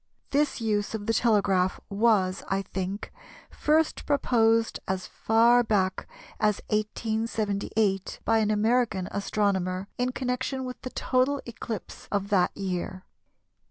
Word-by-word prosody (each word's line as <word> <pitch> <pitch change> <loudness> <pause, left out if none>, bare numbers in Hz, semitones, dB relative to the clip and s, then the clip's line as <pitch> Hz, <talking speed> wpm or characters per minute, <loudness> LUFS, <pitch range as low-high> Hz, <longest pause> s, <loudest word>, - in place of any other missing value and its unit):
This 290 -1 +1
use 215 -1 -1
of 205 -2 -5
the 225 - +1
telegraph 200 -6 +2
was, 200 -3 +2
I 195 0 0
think, 190 +2 -4 0.4
first 310 +1 +1
proposed 230 -5 +2
as 185 -1 -2
far 230 +4 +4
back 195 -5 0 0.3
as 210 -1 +2
1878, 215 -2 -1
by 225 0 +3
an 215 -1 +1
American 215 -3 +1
astronomer, 195 -2 -1
in 250 +1 +1
connection 260 +1 -2
with 250 0 -7
the 255 - -5
total 260 +3 +1
eclipse 230 -3 -7
of 200 -1 -1
that 190 -4 +2
year. 185 -1 -4
215 Hz, 125 wpm, -27 LUFS, 195-235 Hz, 0.4 s, far